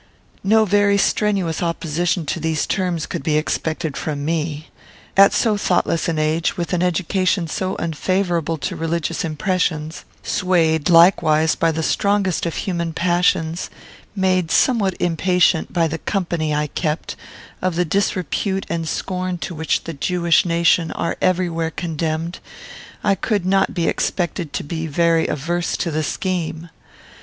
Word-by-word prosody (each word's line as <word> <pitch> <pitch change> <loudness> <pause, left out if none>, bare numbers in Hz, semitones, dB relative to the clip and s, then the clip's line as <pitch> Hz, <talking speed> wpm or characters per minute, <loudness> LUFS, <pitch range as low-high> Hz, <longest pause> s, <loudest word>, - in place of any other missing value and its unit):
"No 220 +3 +4
very 205 0 +3
strenuous 195 -5 +1
opposition 170 0 -1
to 165 - -2
these 160 -1 0
terms 180 -4 -1
could - - -5
be 150 +2 +1
expected 155 -1 -2
from 145 -2 -3
me. 155 -1 -2 0.5
At 195 0 +7
so 220 -3 +2
thoughtless 175 -4 +1
an 165 - -1
age, 155 +5 0
with 175 +1 -3
an 175 - +1
education 180 0 +1
so 185 +4 -2
unfavourable 170 0 -1
to - - -4
religious 165 0 -2
impressions; 160 0 -1 0.2
swayed, 165 -4 +1
likewise, 165 -2 +5
by 165 - +1
the 160 0 -2
strongest 200 -2 +1
of 165 - -4
human 170 -3 -2
passions; 175 -1 +1 0.5
made 185 -3 +1
somewhat 210 -6 +2
impatient, 175 -1 +2
by 170 -2 +2
the 165 +1 -4
company 170 -6 -1
I 150 0 +1
kept, 155 +1 -3 0.5
of 185 -2 0
the 180 +1 +1
disrepute 190 +2 -1
and 165 -1 -2
scorn 185 -1 -3
to 175 - -5
which 160 0 -1
the 165 - -6
Jewish 170 +4 +2
nation 170 -1 +2
are 170 - -2
everywhere 175 -3 +1
condemned, 165 +1 -3 0.6
I - - +3
could 200 0 -1
not 195 +1 +2
be 170 - 0
expected 170 -3 -1
to - - -2
be 160 +1 -4
very 165 +2 +2
averse 170 +4 -2
to 170 - -2
the 155 +1 -1
scheme. 170 -1 -3
170 Hz, 145 wpm, -20 LUFS, 160-185 Hz, 0.6 s, At